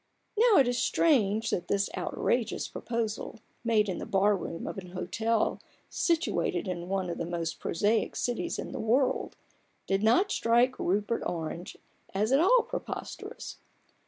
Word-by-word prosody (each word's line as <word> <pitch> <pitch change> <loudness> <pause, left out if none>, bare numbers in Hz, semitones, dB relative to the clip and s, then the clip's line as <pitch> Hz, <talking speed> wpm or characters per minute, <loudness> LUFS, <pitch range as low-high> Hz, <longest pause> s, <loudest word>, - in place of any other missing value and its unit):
Now 445 -1 +5
it 265 - +6
is 245 0 0
strange 225 -8 +2
that 175 - -1
this 200 0 +1
outrageous 235 -2 -1
proposal, 230 -1 -3 0.3
made 220 -3 +3
in 190 - -3
the - - -6
bar 200 +1 +3
room 170 -2 -5
of - - -4
an 180 -1 -11
hotel 220 +5 0 0.3
situate 335 -1 +1
in 175 -1 -4
one 190 -1 0
of - - -5
the 170 - -1
most 170 -1 -3
prosaic 210 +6 +1
cities 250 +8 -2
in - - -5
the - - -5
world, 250 +4 +1 0.5
did 195 0 +1
not 245 - +4
strike 240 +3 +3
Rupert 205 +5 0
Orange 170 +1 -4 0.4
as 210 +4 +1
at 270 - +5
all 465 +9 +5
preposterous. - - -6
220 Hz, 155 wpm, -29 LUFS, 190-245 Hz, 0.5 s, it